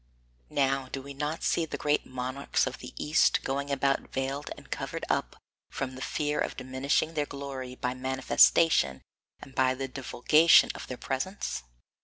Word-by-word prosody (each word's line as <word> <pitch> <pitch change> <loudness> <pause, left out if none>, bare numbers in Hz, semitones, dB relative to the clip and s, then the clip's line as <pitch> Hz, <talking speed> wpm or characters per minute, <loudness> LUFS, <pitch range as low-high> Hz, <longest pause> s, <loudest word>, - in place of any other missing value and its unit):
Now 135 -1 +1
do 135 - -3
we 140 +1 -9
not 150 +3 -3
see 170 - +2
the - - -4
great 150 0 0
monarchs 130 +2 -1
of - - -5
the - - -8
East 150 +2 +3
going 140 +1 -2
about 140 0 0
veiled 135 +2 -3
and - - -15
covered - - -4
up - - -1 0.3
from 130 -1 -4
the 130 - -9
fear 150 +1 -1
of - - -2
diminishing 130 +5 0
their 150 -2 -1
glory 135 -3 -6
by 125 0 -2
the 130 - -12
manifestation 130 - +4 0.4
and 135 - -12
the 130 +1 +1
divulgation 140 +5 +4
of - - -8
their 125 - -6
presence? 135 - -3
135 Hz, 165 wpm, -29 LUFS, 130-145 Hz, 0.4 s, manifestation